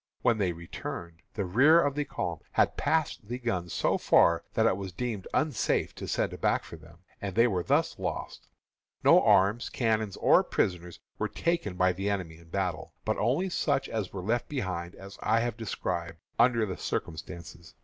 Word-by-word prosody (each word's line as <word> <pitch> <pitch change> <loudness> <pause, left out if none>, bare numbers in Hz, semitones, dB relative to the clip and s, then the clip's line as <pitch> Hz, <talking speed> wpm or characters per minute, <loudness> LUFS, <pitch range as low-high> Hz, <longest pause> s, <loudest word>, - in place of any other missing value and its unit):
When 115 -2 +3
they 95 -3 +1
returned, 85 0 -7
the 100 - -1
rear 135 - +6
of 145 -4 +2
the 145 +1 -1
column 85 - -3
had - - +3
passed 155 -9 0
the 120 +2 -3
guns 95 -9 -2
so - - +1
far 85 0 +4
that 110 - +3
it 115 - +4
was 95 -1 -6
deemed 110 0 -4
unsafe 150 -8 0
to - - -7
send - - -1
back - - +2
for - - -10
them, 80 +2 -17 0.2
and 100 -2 -4
they 115 +1 +6
were 95 -7 +1
thus - - +1
lost. - - -5 0.6
No - - +7
arms, 100 +5 +3
cannon, 110 -3 0
or - - +5
prisoners 90 -2 -2 0.2
were - - -1
taken 170 - -1
by 90 0 +3
the 95 +3 -2
enemy 90 -5 -3
in 85 0 -18
battle, 90 -4 -3
but - - 0
only 135 - +1
such 140 -5 0
as 110 -5 -3
were 95 -2 -6
left 115 +5 -1
behind, 95 -10 -3
as 95 +1 -11
I 110 +1 +2
have 120 -1 -1
described, 85 -7 -4 0.2
under 120 -2 +4
the 95 -3 -5
circumstances. 85 0 -6
100 Hz, 185 wpm, -29 LUFS, 85-120 Hz, 0.6 s, No